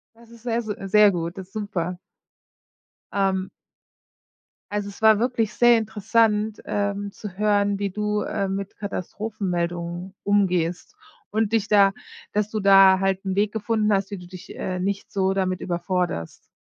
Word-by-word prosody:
Das 230 0 -19
ist 235 -1 -16
sehr, 235 -1 0
se 215 -3 -4
sehr 210 +1 +6
gut, 170 0 -4
das 190 - -8
ist 195 - -32
super. 185 -5 -3 1.2
Ähm. 190 -1 0 1.2
Also, 205 -1 -2
es 200 - -13
war 220 -1 +6
wirklich 230 -3 0
sehr 240 -1 +5
interessant, 220 0 +1
ähm, 205 0 -2
zu 195 -2 -9
hören, 205 -1 +2
wie 200 -1 -1
du, 210 +1 -1
äh, 200 -1 -2
mit 195 +1 -4
Katastrophenmeldungen 180 -3 -4
umgehst 180 -4 0 0.3
und 220 0 0
dich 215 -3 +2
da 200 -2 +5 0.4
dass 210 0 0
du 215 - -2
da 195 -1 +7
halt 195 0 0
'n 190 -1 -1
Weg 205 +1 +2
gefunden 215 0 0
hast, 195 0 0
wie 200 - -4
du 180 -1 -11
dich, 180 0 -11
äh, 185 -1 -3
nicht 195 +2 -3
so 190 -1 +1
damit 185 -1 -1
überforderst. 175 - -3
200 Hz, 160 wpm, -24 LUFS, 185-210 Hz, 1.2 s, da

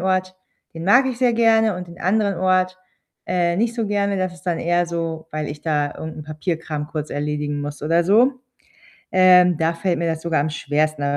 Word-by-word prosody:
Ort, 185 0 -1 0.4
den 165 0 -6
mag 250 +7 +5
ich 250 -2 -3
sehr 250 -2 +3
gerne 225 -2 +3
und 180 -1 -7
den 170 - -13
anderen 200 0 +1
Ort, 185 0 +1 0.5
äh, 175 -1 +1
nicht 230 +2 0
so 230 -2 -2
gerne. 200 -1 0
Das 185 -1 -2
ist - - -17
dann 175 -2 -1
eher 175 +1 +1
so, 165 -1 -4
weil 155 -1 -3
ich 145 0 -8
da 150 -2 0
irgend 160 0 -7
'n - - -6
Papierkram 155 -1 -4
kurz 150 0 -5
erledigen 145 0 -3
muss 145 0 -6
oder 165 +3 +2
so. 235 +8 +4 0.8
Ähm, 180 -2 +6
da 165 +1 +1
fällt 175 +1 -1
mir 170 - -1
das 160 -1 -2
sogar 165 -3 0
am 155 - -1
schwersten, 150 0 -1
175 Hz, 205 wpm, -21 LUFS, 155-190 Hz, 0.8 s, Ähm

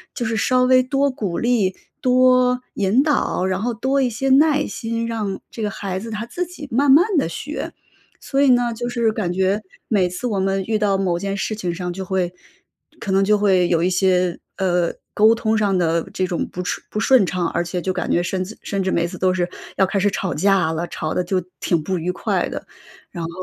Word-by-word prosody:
就 240 - -2
是 225 0 -1
稍 255 +4 +2
微 255 0 +5
多 275 +2 +1
鼓 200 -9 -3
励 225 -6 +1 0.3
多 255 -1 +4 0.2
引 205 +8 +3
导， 285 -10 0
然 190 0 -1
后 240 +2 -1
多 265 +5 0
一 250 - +2
些 255 +4 -2
耐 295 +2 +4
心， 230 0 -3
让 210 -4 -3
这 230 - -7
个 210 - 0
孩 195 -2 -4
子 225 +3 -7
他 215 +1 -4
自 355 +9 -3
己 310 -4 -9
慢 275 +4 +3
慢 310 +7 +7
地 - - 0
学。 295 - -5 0.5
所 275 0 -1
以 280 - +5
呢， 245 -2 +3
就 240 +1 -4
是 235 -2 +1
感 205 -5 -2
觉 190 +3 +1 0.3
每 190 -5 +2
次 180 +8 -6
我 205 -4 -1
们 195 0 0
遇 220 -1 0
到 200 -2 +2
某 180 -3 0
件 200 +1 -3
事 215 - -2
情 180 -5 -3
上 180 0 -4
就 190 - -5
会 185 -2 -1 0.7
可 200 - -4
能 195 +1 +3
就 210 +1 +3
会 190 -4 +3
有 170 -1 +1
一 180 - +2
些， 180 -1 +2 0.2
呃， 180 -3 +1 0.2
沟 220 +2 +5
通 220 -1 0
上 205 -3 +2
的 170 -1 +1
这 185 -2 -1
种 175 -2 -2
不 180 - -4
顺 - - -3
不 215 - -3
顺 255 -2 +5
畅， 175 0 -1
而 170 - -1
且 175 +1 -3
就 185 +1 -2
感 - - -2
觉 175 - +2
甚 185 +1 -2
至 205 +4 -9
甚 195 -1 -2
至 190 - -1
每 170 -2 +1
次 180 0 -9
都 185 -1 +2
是 175 -1 0 0.3
要 190 - +3
开 195 +2 -1
始 205 +1 +3
吵 190 -2 -2
架 195 -5 +2
了， 165 +2 -3
吵 155 -1 -4
得 180 - 0
就 185 +1 0 0.2
挺 170 -3 0
不 185 +3 -2
愉 175 +3 -1
快 180 - -1
的。 - - -6 0.5
然 170 -3 -5
后 165 - -4
200 Hz, 250 characters per minute, -21 LUFS, 180-240 Hz, 0.7 s, 慢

